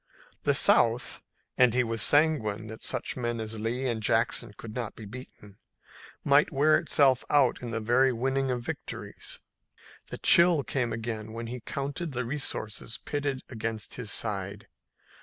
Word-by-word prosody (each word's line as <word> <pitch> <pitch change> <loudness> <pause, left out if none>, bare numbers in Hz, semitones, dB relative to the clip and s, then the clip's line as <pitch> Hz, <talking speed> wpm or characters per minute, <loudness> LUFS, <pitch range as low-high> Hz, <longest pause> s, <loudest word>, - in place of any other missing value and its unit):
The - - +3
South 115 +1 +4 0.4
and 125 -2 +5
he 125 - +3
was 115 -2 -1
sanguine 140 -9 +3
that 110 - -9
such - - -2
men 120 -2 -2
as 110 0 -5
Lee 120 +4 -2
and 115 -3 -2
Jackson 115 +1 +1
could 110 -2 -9
not 115 -3 -4
be 110 - -10
beaten 105 -3 -12 0.7
might 145 +4 +4
wear 155 +2 +4
itself 140 -6 +3
out 140 -4 +3
by 120 - -5
the 115 - -2
very 120 +4 +3
winning 135 +3 -1
of 125 -1 -2
victories. - - -7 0.7
The - - -7
chill 170 -4 +5
came 125 -4 -2
again 110 -1 -5
when 115 +1 -5
he 125 +2 -6
counted 145 +6 -4
the 125 0 -2
resources 115 -5 -3
pitted 145 -2 -2
against 110 -2 -5
his 120 -4 -5
side. 100 -2 -1
120 Hz, 160 wpm, -28 LUFS, 110-135 Hz, 0.7 s, and